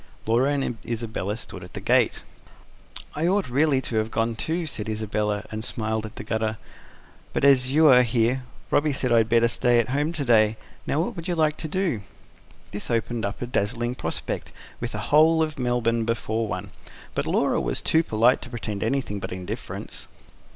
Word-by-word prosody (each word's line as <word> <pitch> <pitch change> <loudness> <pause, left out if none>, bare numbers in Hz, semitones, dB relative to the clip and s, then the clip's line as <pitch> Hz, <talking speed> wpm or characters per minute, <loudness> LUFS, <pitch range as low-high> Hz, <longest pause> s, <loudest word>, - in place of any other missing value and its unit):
Laura 120 +5 +3
and 135 -5 -1
Isabella 110 -3 -3
stood 95 -5 -6
at 90 - -11
the - - -3
gate. - - +2 0.9
"I 160 +3 0
ought 195 -3 +2
really 140 0 +3
to 120 -3 -3
have 110 0 0
gone, 115 0 0
too," 165 +9 -1
said 110 -8 -4
Isabella, 105 -1 -1
and 110 0 -4
smiled 110 -2 -2
at 110 - -14
the - - -6
gutter. 110 0 -1 0.8
"But - - -1
as 130 -2 +5
you 155 +3 +5
are 125 -1 +8
here, 120 +2 +1 0.3
Robby 145 0 +3
said 130 -2 -1
I 120 - +6
had 110 0 +1
better 115 0 +4
stay 120 +1 +2
at 120 0 +2
home 145 +4 0
to 150 -4 -3
day. 110 -2 +4 0.3
Now 150 - +1
what 175 - -3
would 170 0 -6
you 175 - 0
like 155 -2 +2
to 160 - -4
do?" 165 - -1 0.7
This 105 - -5
opened 115 -1 -1
up 100 +4 -4
a - - -1
dazzling 120 0 -1
prospect, 125 - -4 0.3
with 120 0 -4
the 110 +5 -5
whole 160 +2 +6
of 155 -3 -4
Melbourne 120 -2 +1
before 115 0 -1
one. - - -5 0.4
But - - -2
Laura - - +2
was - - -2
too 160 - +4
polite 120 -3 +3
to 125 - -8
pretend 110 -4 -5
anything 115 -4 -1
but - - -6
indifference. 90 -1 -6
120 Hz, 195 wpm, -25 LUFS, 110-140 Hz, 0.9 s, are